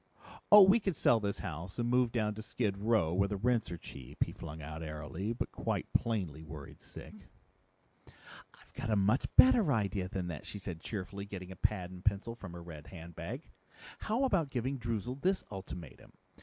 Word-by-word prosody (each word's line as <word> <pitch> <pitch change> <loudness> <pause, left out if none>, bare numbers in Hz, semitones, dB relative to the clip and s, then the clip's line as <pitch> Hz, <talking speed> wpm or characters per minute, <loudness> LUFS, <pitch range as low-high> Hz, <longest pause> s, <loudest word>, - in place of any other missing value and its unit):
"Oh 205 -1 +12
we 195 +5 +6
could 195 -5 -1
sell 120 -3 +4
this 100 -1 -2
house 85 0 -6
and 120 0 0
move 125 -1 +3
down 110 -3 0
to 110 - -7
skid 105 -2 -1
row 100 -5 +2
where 100 +2 +3
the 100 0 -2
rents 115 -2 +1
are 85 - -4
cheap," 70 -5 -4
he - - -6
flung 80 +2 -8
out 80 +2 -6
airily, 80 +6 -4
but 120 - -3
quite - - -2
plainly 95 -10 0
worried 80 -2 -10
sick. - - -10 0.9
"I've - - -18
got - - -4
a 110 - +3
much 105 +6 +3
better 230 - +7
idea 100 -5 0
than 95 -2 -3
that," 80 - -6
she - - -5
said 90 -5 -6
cheerily, 100 -1 -5
getting 95 -2 -7
a - - -7
pad 95 -4 0
and 90 0 -10
pencil 105 +3 +1
from 95 -7 -9
her 85 -1 -8
red 80 -3 -10
handbag. 85 -2 -7 0.5
"How 230 +5 0
about 190 - +2
giving 130 +1 -2
Droozle 120 +3 -3
this 190 +1 +2
ultimatum?" 90 -6 -8
100 Hz, 190 wpm, -33 LUFS, 90-120 Hz, 0.9 s, Oh